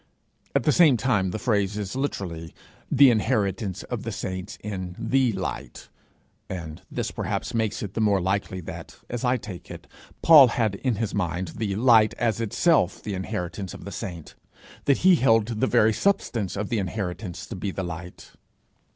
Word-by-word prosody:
At -, -, +3 dB
the 150 Hz, -, +3 dB
same 150 Hz, -4 st, +5 dB
time 105 Hz, -7 st, +1 dB
the 90 Hz, -, -3 dB
phrase 105 Hz, -3 st, 0 dB
is 100 Hz, 0 st, -4 dB
literally 90 Hz, -, -4 dB, 0.4 s
'the 135 Hz, -1 st, +7 dB
inheritance 100 Hz, -3 st, 0 dB
of -, -, -5 dB
the -, -, -4 dB
saints 95 Hz, -1 st, -5 dB
in 95 Hz, -4 st, -5 dB
the 125 Hz, +2 st, +2 dB
light;' 95 Hz, -9 st, -6 dB, 0.6 s
and 85 Hz, -4 st, -6 dB
this -, -, -3 dB
perhaps -, -, -3 dB
makes 110 Hz, +1 st, -1 dB
it 100 Hz, -2 st, -6 dB
the 115 Hz, -, -1 dB
more 100 Hz, -2 st, +3 dB
likely 95 Hz, 0 st, -1 dB
that, 80 Hz, -, -9 dB
as 120 Hz, -1 st, -3 dB
I 125 Hz, 0 st, +2 dB
take 100 Hz, -6 st, -9 dB
it, -, -, -9 dB, 0.4 s
Paul 150 Hz, -5 st, +9 dB
had 115 Hz, -4 st, 0 dB
in 120 Hz, +4 st, -1 dB
his 110 Hz, 0 st, -2 dB
mind 90 Hz, -2 st, -2 dB
the 100 Hz, +2 st, -3 dB
light 110 Hz, -1 st, +5 dB
as 115 Hz, -2 st, 0 dB
itself 115 Hz, -, +2 dB
the 105 Hz, -, -4 dB
inheritance 90 Hz, 0 st, -4 dB
of -, -, -11 dB
the -, -, -6 dB
saints 85 Hz, -5 st, -7 dB, 0.5 s
that 140 Hz, -, +4 dB
he 185 Hz, -2 st, +7 dB
held 115 Hz, -5 st, +4 dB
the -, -, +2 dB
very 110 Hz, +1 st, +4 dB
substance 115 Hz, -, 0 dB
of 100 Hz, +1 st, -3 dB
the 115 Hz, -, 0 dB
inheritance 95 Hz, -1 st, -4 dB
to -, -, -7 dB
be 95 Hz, +2 st, -3 dB
the 95 Hz, 0 st, -4 dB
light. 90 Hz, 0 st, -8 dB
105 Hz, 175 wpm, -25 LUFS, 95-115 Hz, 0.6 s, Paul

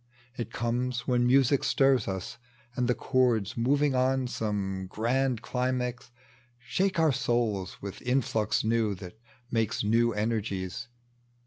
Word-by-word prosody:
It 120 Hz, -1 st, -5 dB
conies 120 Hz, +1 st, -1 dB
when 125 Hz, -1 st, +1 dB
music 135 Hz, +1 st, +4 dB
stirs 135 Hz, -4 st, +3 dB
us, 110 Hz, +4 st, -5 dB, 0.4 s
and 125 Hz, 0 st, 0 dB
the 125 Hz, -, +2 dB
chords 115 Hz, -4 st, +1 dB
Moving 140 Hz, +4 st, +2 dB
on 130 Hz, 0 st, +2 dB
some 100 Hz, -5 st, -3 dB
grand 125 Hz, +3 st, 0 dB
climax 125 Hz, -1 st, -2 dB, 0.5 s
shake 185 Hz, +10 st, -1 dB
our 160 Hz, -2 st, +4 dB
souls 110 Hz, -8 st, -1 dB
With 100 Hz, -1 st, -6 dB
influx 120 Hz, -4 st, 0 dB
new 110 Hz, -2 st, +1 dB
that 90 Hz, +3 st, -11 dB, 0.3 s
makes 115 Hz, +1 st, 0 dB
now 115 Hz, +3 st, +3 dB
enei^es. 105 Hz, -1 st, -2 dB
120 Hz, 125 wpm, -28 LUFS, 110-125 Hz, 0.5 s, music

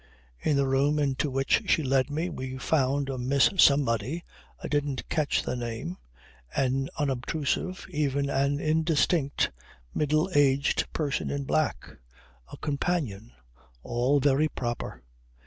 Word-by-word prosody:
In 150 Hz, -, +1 dB
the 140 Hz, -, +3 dB
room 135 Hz, +3 st, +2 dB
into 145 Hz, 0 st, 0 dB
which 135 Hz, 0 st, +2 dB
she 160 Hz, -, +3 dB
led 135 Hz, 0 st, +2 dB
me 155 Hz, +4 st, -1 dB
we 130 Hz, -2 st, -5 dB
found 140 Hz, 0 st, +1 dB
a 135 Hz, -2 st, -3 dB
Miss 130 Hz, +2 st, +3 dB
Somebody 140 Hz, -, +3 dB, 0.4 s
I -, -, -3 dB
didn't 145 Hz, -3 st, -1 dB
catch 150 Hz, -2 st, +1 dB
the -, -, -2 dB
name, 115 Hz, -7 st, -4 dB, 0.6 s
an 135 Hz, 0 st, +1 dB
unobtrusive, 145 Hz, +6 st, -2 dB
even 140 Hz, -1 st, 0 dB
an 140 Hz, +1 st, +1 dB
indistinct, 155 Hz, -1 st, +1 dB, 0.4 s
middle 155 Hz, +3 st, +1 dB
aged 140 Hz, -1 st, +2 dB
person 150 Hz, -2 st, -2 dB
in 140 Hz, 0 st, -2 dB
black. 155 Hz, +2 st, 0 dB, 0.6 s
A -, -, -8 dB
companion. 140 Hz, -, -2 dB, 0.5 s
All 125 Hz, +4 st, +1 dB
very 140 Hz, +2 st, +3 dB
proper. 120 Hz, -, -5 dB
140 Hz, 130 wpm, -27 LUFS, 130-150 Hz, 0.6 s, the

